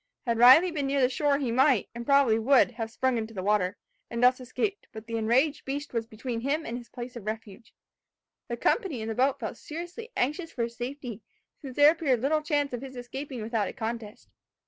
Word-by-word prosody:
Had 230 -2 0
Riley 265 +9 +8
been 290 -4 -2
near 275 +1 +1
the 250 -1 +4
shore 285 +1 +1
he 265 -5 -2
might, 260 -2 +3
and 235 0 -7
probably 275 -6 +4
would, 255 +2 +4
have 225 -2 -5
sprung 255 +1 0
into 225 0 -6
the 185 - -4
water, 205 -2 +1 0.3
and 235 +1 -2
thus 250 +1 +5
escaped; 395 - -3
but 220 -2 -9
the 230 0 -5
enraged 240 +7 +2
beast 285 +1 -5
was 230 -1 -2
between 230 +1 -5
him 295 +5 -1
and 230 - -4
his 240 -1 -8
place 245 +1 -8
of 220 -3 -9
refuge. 220 0 -6 0.8
The 235 - -4
company 305 - 0
in 220 - -4
the - - -1
boat 260 +4 +1
felt - - -5
seriously 345 +9 -8
anxious 305 +6 -1
for 235 - -2
his 235 0 -4
safety, 245 -3 -6 0.4
since 265 -4 -8
there 290 +1 +7
appeared 290 -7 +1
little 305 +3 +2
chance 290 -3 0
of 245 - -4
his 265 -1 -9
escaping 250 0 -6
without 220 -2 -1
a - - -6
contest. 230 -3 -6
250 Hz, 215 wpm, -28 LUFS, 230-280 Hz, 0.8 s, Riley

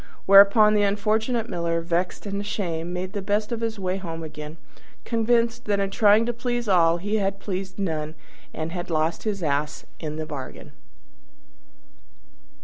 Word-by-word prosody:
Whereupon 200 +2 +7
the 210 - +3
unfortunate 215 +3 0
Miller, 170 -4 -1
vexed 170 +4 -2
and 200 0 -3
ashamed, 175 -5 -3
made 180 +2 -4
the 205 - -3
best 210 +3 -1
of 230 -1 -3
his 225 -1 -2
way 185 -1 -2
home 165 -4 -6
again, 150 0 -8 0.5
convinced 235 +1 +1
that 205 -1 +1
in 195 0 -1
trying 210 +2 +4
to 240 - -1
please 240 0 -2
all 170 -3 +4
he 205 +5 -1
had 195 -1 -1
pleased 190 -1 -5
none, 160 -5 -3 0.4
and 160 +1 -5
had 175 0 -5
lost 160 +3 -1
his 200 -4 -2
Ass 150 0 -1
into 155 -1 -5
the 155 - -3
bargain. 145 -4 -8
195 Hz, 160 wpm, -24 LUFS, 165-215 Hz, 0.5 s, Whereupon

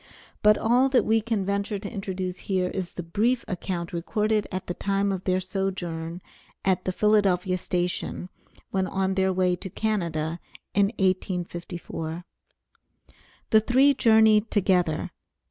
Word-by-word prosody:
But 210 0 +6
all 245 +4 +3
that 260 -2 +3
we 225 +1 +3
can 215 -3 -1
venture 200 +1 -1
to 200 +1 -6
introduce 190 -3 -4
here 185 -2 +1
is 185 -2 -4
the 175 - -5
brief 230 +9 0
account 180 -2 -4
recorded 210 +5 0
at 185 0 -4
the 175 - -3
time 200 +2 0
of 190 -1 -4
their 185 0 +2
sojourn 180 -3 -4 0.4
at 185 -1 +1
the 185 - 0
Philadelphia 195 -3 +2
station 180 +1 -3 0.4
when 190 -1 0
on 190 0 0
their 190 0 +2
way 180 -1 +2
to 190 - -7
Canada 170 -6 -2 0.3
in 200 0 +4
1854. 175 -3 -3 1.3
The 220 - +7
three 260 +6 +4
journeyed 220 -3 +4
together. 180 -6 +1
190 Hz, 140 wpm, -26 LUFS, 180-210 Hz, 1.3 s, The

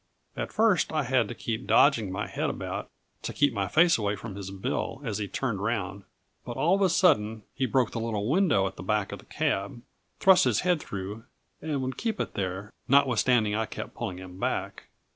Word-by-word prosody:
At - - -4
first, 220 -5 +3
I 155 -2 0
had 125 -3 +2
to - - -6
keep 115 +2 -4
dodging 115 -9 +4
my 100 +3 -2
head - - -2
about, - - -5 0.3
to - - -4
keep 145 -3 +2
my 100 -3 -1
face 165 - +4
away 105 -1 0
from 100 +1 -8
his 100 -1 -6
bill 100 +6 -3
as 110 -3 -2
he 105 - -2
turned 110 -3 -2
round; 100 -3 -2 0.4
but 120 - -6
all 155 +7 +3
of 200 - +2
a 190 - +4
sudden 115 - +3
he 130 0 -1
broke 125 -1 +2
the 115 - -3
little 110 -2 -2
window 150 - +3
at 95 - -4
the - - -7
back 105 +1 0
of - - -6
the - - -16
cab, 100 +5 -2 0.4
thrust 190 -1 +6
his - - +2
head 180 -4 +1
through, 105 +4 -6 0.4
and 145 -4 -2
would 130 0 -3
keep 225 -2 -2
it - - -3
there, 95 +1 -4
notwithstanding 125 -5 +3
I 110 +1 0
kept - - -7
pulling 110 -6 -4
him 95 0 -10
back. - - -2
115 Hz, 210 wpm, -28 LUFS, 100-140 Hz, 0.4 s, thrust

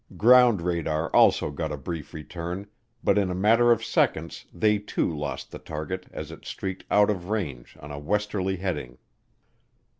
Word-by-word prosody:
Ground 120 -5 +6
radar 85 -2 -1
also - - +5
got 75 +2 -3
a 75 - -3
brief 80 +2 -6
return, 85 +4 -6 0.4
but 100 - +3
in 100 -2 +1
a 90 - -2
matter 115 +5 +4
of 115 -1 +2
seconds 80 +1 0
they 105 +3 +2
too 100 -5 -2
lost 75 -3 -5
the - - -8
target 80 +4 -5
as - - -7
it - - -11
streaked 95 -1 -5
out 105 0 +4
of 90 -2 -5
range 75 - -4
on 75 - -9
a 70 - -6
westerly 95 +3 -1
heading. 75 -10 -4
90 Hz, 170 wpm, -26 LUFS, 75-105 Hz, 0.4 s, Ground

